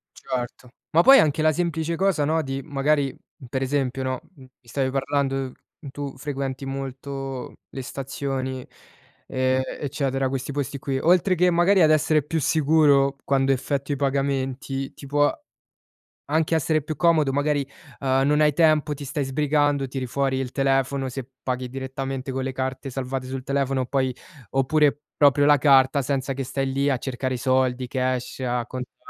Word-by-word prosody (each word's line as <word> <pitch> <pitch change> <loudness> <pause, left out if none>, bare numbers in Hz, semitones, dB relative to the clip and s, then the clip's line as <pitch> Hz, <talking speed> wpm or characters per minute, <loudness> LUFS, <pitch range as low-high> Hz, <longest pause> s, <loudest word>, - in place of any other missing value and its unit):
Certo. 125 0 -5 0.2
Ma 165 - +5
poi 270 +7 +9
anche 155 +1 +3
la 155 - +4
semplice 165 0 -1
cosa, 190 -6 +1
no, 160 +2 +1
di 135 -1 -4
magari 140 -1 0 0.3
per 130 +2 -2
esempio, 135 -1 -1
no, 130 -1 -2 0.2
mi 130 -2 -15
stavi 130 +2 -2
parlando, 135 -1 -1 0.4
tu 140 -1 -6
frequenti 135 -1 -4
molto 135 -1 -5 0.2
le 135 - -6
stazioni 130 -1 -4 0.6
e 130 0 +1 0.2
eccetera, 135 -2 -1
questi 135 +1 -3
posti 140 -1 -3
qui. 135 0 -2
Oltre 180 +4 +3
che 180 +1 +3
magari 175 +3 +4
ad 155 - +5
essere 155 0 +3
più 160 +3 -2
sicuro, 145 -3 +3
quando 135 0 +2
effettui 140 +2 -1
i - - -5
pagamenti, 135 0 -1
ti 140 - -11
può 145 +1 +2 1.0
anche 160 +1 +2
essere 155 0 +1
più 155 +1 -5
comodo, 160 -5 +3
magari, 145 +1 +1 0.4
ehm, 135 0 +2
non 150 +1 +3
hai 150 -1 +5
tempo, 155 -1 +3
ti 145 - -8
stai 140 +1 -2
sbrigando, 145 0 +1
tiri 130 -1 -4
fuori 135 +1 0
il 130 -1 -3
telefono, 135 0 +1
se 130 0 -7
paghi 125 -1 -2
direttamente 135 0 -4
con 130 0 -2
le 130 - -2
carte 130 +1 -4
salvate 130 0 -4
sul 130 0 -5
telefono, 135 -1 0
poi 130 -1 0 0.4
oppure 145 +2 +2
proprio 145 0 +4
la 145 0 +6
carta, 135 0 +5
senza 135 0 -1
che 135 0 -3
stai 135 +1 -2
lì 140 +1 +1
a 135 - +1
cercare 130 0 -3
i - - -3
soldi 130 0 +1
cash, 130 0 -2
a 125 -2 -1
contare. 125 0 -7
135 Hz, 165 wpm, -24 LUFS, 130-145 Hz, 1.0 s, poi